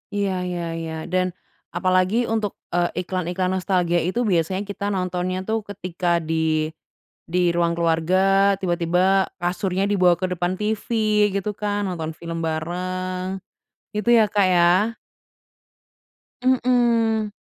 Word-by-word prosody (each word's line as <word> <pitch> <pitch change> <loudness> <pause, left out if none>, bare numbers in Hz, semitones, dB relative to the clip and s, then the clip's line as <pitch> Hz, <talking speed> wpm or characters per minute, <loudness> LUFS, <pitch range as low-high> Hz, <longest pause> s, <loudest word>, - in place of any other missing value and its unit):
Iya 200 -1 0 0.2
iya 175 -1 -3 0.2
iya. 160 -1 -5 0.2
Dan, 185 0 +2 0.5
apalagi 185 +3 +2
untuk, 215 -3 -1 0.2
eee, 175 0 +1
iklan-iklan 185 +1 -2
nostalgia 180 -2 +1
itu, 205 +6 -1
biasanya 180 +3 +1
kita 200 0 -4
nontonnya, 180 0 -2
tuh, 220 0 +1
ketika 185 -3 -5 0.2
di 160 -1 0 0.6
di 175 0 +2
ruang 170 -1 +1
keluarga, 165 +1 +1 0.4
tiba-tiba 180 +2 +2
kasurnya 180 +2 -1
dibawa 185 -4 +3
ke 185 - -1
depan 175 0 -1
TV, 215 0 -1 0.5
gitu 200 +1 -1
kan, 205 0 -1
nonton 165 -4 -3
film 165 0 -5
bareng. 185 +3 -3 0.6
Gitu 210 +2 -1
ya, 220 - +6
Kak, 205 -2 +3
ya. 175 -1 +4 1.8
Mhm. 235 -4 +2
185 Hz, 120 wpm, -22 LUFS, 175-200 Hz, 1.8 s, ya